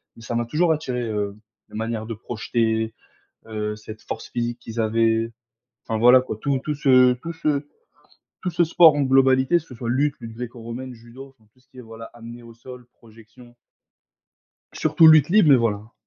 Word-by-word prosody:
mais 115 - -15
ça 120 - -5
m'a 120 - -1
toujours 160 +7 +1
attiré, 130 -5 -4
heu, 105 -2 -3 0.3
la - - -13
manière 110 0 -4
de 115 - -5
projeter, 110 0 -2 0.5
heu, 105 -1 -4
cette 105 0 -11
force 110 - -7
physique 120 0 -3
qu'ils 115 0 -8
avaient. 115 +1 +1 0.5
Enfin 110 - -3
voilà 125 +3 +6
quoi, 120 -4 -7
tout 140 +1 0
tout 150 - -2
ce 130 -3 +4
tout 165 +7 -8
ce 150 -3 -2 0.8
tout 180 - -2
ce 175 +1 +2
sport 165 -1 +6
en 145 - +1
globalité, 130 +2 +3
que 170 - 0
ce 145 -5 -14
soit 115 0 -6
lutte, 145 +3 +1
lutte 115 -1 -9
gréco-romaine, 120 +1 -8
judo, 120 +4 -13
enfin, 110 -1 -29
tout 130 - -29
ce 130 - -34
qui 130 - -18
est, - - -7
voilà, 115 0 -11
amené 120 0 -11
au 115 -1 -14
sol, 125 +1 -13
projection 115 +2 -18 1.2
surtout 165 - +3
lutte 155 -2 +7
libre, 175 -5 +4
mais 135 - +8
voilà. 110 -2 -2
120 Hz, 190 wpm, -22 LUFS, 115-135 Hz, 1.2 s, mais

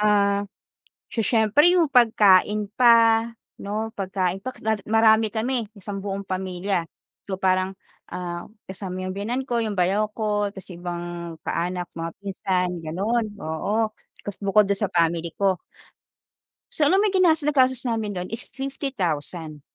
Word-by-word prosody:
ah, 200 -1 +3 0.7
so - - -2
siyempre 220 +6 +3
yung 345 -3 +4
pagkain 210 -4 +4
pa, 230 -2 +6 0.4
'no, 215 +2 -3
pagkain 190 -1 -1
pa 255 - -3 0.2
lalo 220 -2 +1
marami 220 0 +5
kami 235 0 -1
isang 200 0 -6
buong 200 0 -4
pamilya. 185 0 -2 0.5
So 190 - -2
parang 185 0 +1 0.3
ah, 175 -1 -4 0.2
kasama 185 -1 -5
yung 185 - -3
biyenan 240 +6 -2
ko, 240 -2 0
yung 215 - -2
bayaw 200 +4 +2
ko, 210 -2 0
tas 190 -2 -11
yung 175 -1 -10
ibang 175 -1 -4 0.4
kaanak, 180 +1 -2
mga 165 0 -3
pinsan 190 -2 -1
ganun, 205 +9 0
oo, 205 +8 -1 0.4
tas 205 - -5
bukod 200 +1 +4
dun 200 -1 0
sa 200 - -1
family 170 0 +1
ko. 195 -2 +2 1.1
So 300 - +1
alam 375 +7 +4
mo 425 - +3
yung 385 - -1
ginas 325 -3 +4
nagastos 260 -4 +2
namin 220 -3 -1
dun 180 +1 -4
is 225 - -5
50,000. 180 - -4
200 Hz, 150 wpm, -24 LUFS, 185-225 Hz, 1.1 s, pa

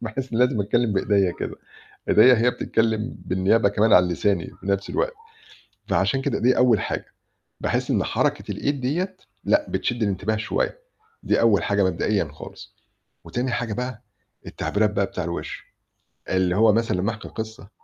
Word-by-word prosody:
باحس 120 +3 -5
إني 115 - 0
لازم 125 -5 0
أتكلم 110 +2 +1
بإيديَّ 95 -2 +2
كده - - -4 0.6
إيديَّ 125 +4 +7
هي - - +6
بتتكلم 115 -1 -1
بالنيابة 95 +4 +2
كمان 105 +2 +3
عن 90 0 +6
لساني 90 0 0
في - - -10
نفس 100 0 -1
الوقت، - - -1 0.7
فعشان 135 -1 +1
كده - - -1
دي 125 +2 +3
أول 120 -5 +4
حاجة. - - -3 0.6
باحس - - -1
إن - - +2
حركة - - -1
الإيد 140 -2 -2
ديّة 180 +8 -2 0.3
لأ 300 0 +2
بتشد 120 -1 -2
الانتباه 100 +2 -1
شوية، 110 - -2 0.4
دي - - +2
أول 115 -4 +4
حاجة 100 -1 +1
مبدئيًا 95 -1 0
خالص. 75 - -12 0.5
وتاني 125 +1 -2
حاجة 120 -2 -2
بقى 125 -1 -4 0.4
التعبيرات 105 +1 0
بقى 100 -1 +1
بتاع 90 -1 -5
الوِش، 85 0 -5 0.7
اللي 95 -1 +1
هو 110 +1 +5
مثلًا 115 -4 +1
لمّا 100 +5 0
أحكِي 110 0 -9
قصة 110 -3 -7
110 Hz, 160 wpm, -23 LUFS, 100-120 Hz, 0.7 s, إيديَّ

